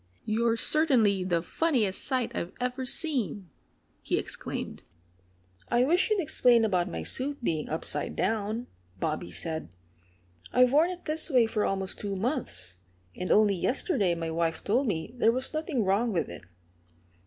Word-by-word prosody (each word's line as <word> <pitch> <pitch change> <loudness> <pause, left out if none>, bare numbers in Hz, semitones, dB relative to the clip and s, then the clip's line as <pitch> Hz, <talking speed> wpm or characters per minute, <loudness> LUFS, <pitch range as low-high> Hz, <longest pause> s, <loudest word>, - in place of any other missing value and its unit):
"You're 230 +1 +1
certainly 230 - +3
the 175 -2 0
funniest 235 - 0
sight 255 -2 -1
I've 170 - -4
ever 250 +1 -2
seen!" 220 - 0 0.5
he - - -1
exclaimed. - - -5 0.9
"I 240 +1 +3
wish 345 - +2
you'd 430 -2 +2
explain 250 -8 +3
about 185 -4 +1
my - - -4
suit 275 0 -2
being 160 -7 -1
upside 160 - -2
down," 220 +3 -1 0.3
Bobby 85 - -2
said. 160 - -4 0.8
"I've 250 +1 +4
worn 315 +4 +5
it 360 -1 -7
this 310 +1 -1
way 250 -5 +5
for 220 -1 -1
almost 195 -1 -1
two 200 -1 -3
months. 190 - 0 0.4
And 180 - -4
only 210 -1 +5
yesterday 210 - +1
my 165 -1 -3
wife 165 0 -1
told 245 +6 +1
me 170 +1 -3
there 230 -2 +4
was 255 +5 -2
nothing 310 - -1
wrong 205 +5 +2
with 175 -5 -1
it." - - -9
225 Hz, 155 wpm, -28 LUFS, 185-260 Hz, 0.9 s, worn